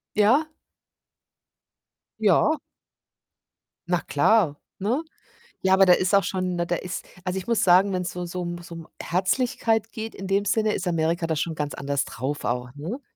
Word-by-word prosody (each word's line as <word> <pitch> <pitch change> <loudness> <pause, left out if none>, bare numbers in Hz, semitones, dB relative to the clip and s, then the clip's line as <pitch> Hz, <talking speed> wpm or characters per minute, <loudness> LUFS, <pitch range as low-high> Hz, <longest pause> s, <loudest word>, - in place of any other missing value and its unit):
Ja? 240 +10 +4 1.7
Ja. 220 - +4 1.3
Na 175 -1 +1
klar, 150 -1 +2 0.2
ne? 240 +11 0 0.6
Ja, 190 0 +3
aber 195 0 +6
da 180 - +7
ist 185 +2 +2
auch 200 - +5
schon 185 -1 -2
ne, 175 0 -1
da 175 - 0
ist 180 +1 -5 0.2
also 185 0 -2
ich 190 - -4
muss 235 -2 +1
sagen, 190 +2 +5
wenn's 180 -1 -2
so 180 0 -5
so 180 +1 -5
um 175 0 -4
so 170 - -10
um 165 -1 -9
Herzlichkeit 225 +3 0
geht 225 0 -6
in 195 - -7
dem 195 +1 +1
Sinne, 215 +1 +2
ist 185 - -3
Amerika 165 0 0
da 160 - 0
schon 160 +2 -1
ganz 150 -1 -3
anders 140 0 -1
drauf 135 +5 -4
auch, 125 +1 -1
ne? 175 - -5
185 Hz, 175 wpm, -25 LUFS, 170-205 Hz, 1.7 s, da